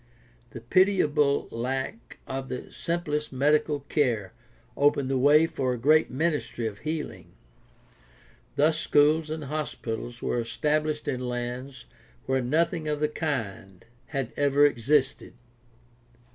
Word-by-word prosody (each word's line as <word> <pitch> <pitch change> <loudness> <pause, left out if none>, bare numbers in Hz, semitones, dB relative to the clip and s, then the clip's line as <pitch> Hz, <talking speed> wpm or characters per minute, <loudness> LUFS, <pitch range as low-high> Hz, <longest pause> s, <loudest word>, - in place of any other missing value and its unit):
The 115 - -9
pitiable 150 - +3
lack 125 0 -4
of 135 0 -5
the 125 - -6
simplest 150 -3 -2
medical 145 +2 +2
care 120 -9 0 0.4
opened 140 -2 +2
the 135 - +2
way 150 +4 +6
for 130 -5 -1
a - - -3
great 155 +6 +4
ministry 150 -4 -1
of 105 -2 -4
healing. 150 - -5 1.2
Thus 155 +2 +3
schools 155 +2 +3
and 155 0 -4
hospitals 120 -5 -4
were 120 - -1
established 150 +5 -1
in 130 -3 -1
lands 125 +1 -5 0.4
where 130 0 +1
nothing 160 +5 0
of 150 -1 -1
the 150 0 +1
kind 110 - -4 0.2
had 135 -5 -3
ever 145 0 +4
existed. 135 +1 +1
140 Hz, 120 wpm, -27 LUFS, 125-150 Hz, 1.2 s, way